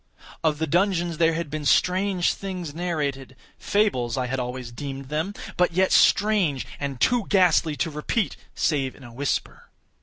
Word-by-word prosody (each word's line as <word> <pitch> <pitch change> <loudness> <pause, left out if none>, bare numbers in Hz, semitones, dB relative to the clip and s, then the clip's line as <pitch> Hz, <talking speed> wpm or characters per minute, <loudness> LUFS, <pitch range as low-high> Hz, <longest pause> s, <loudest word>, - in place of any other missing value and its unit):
Of 155 -2 +2
the 160 - -1
dungeons 175 0 +1
there 165 -1 +3
had 165 -3 -4
been 155 0 -3
strange 180 +5 +2
things 180 -6 -6
narrated—fables 145 - -2
I 130 - 0
had 130 +2 -2
always 125 -1 -5
deemed 135 +1 -7
them—but 175 +2 -1
yet 185 +2 +2
strange, 195 -10 +3
and 140 -3 -4
too 240 - +2
ghastly 175 -5 +3
to 160 +3 -2
repeat, 150 +8 -1 0.2
save 135 -4 0
in 140 - -15
a 120 -1 -11
whisper. 140 +3 -3
160 Hz, 150 wpm, -24 LUFS, 135-180 Hz, 0.2 s, there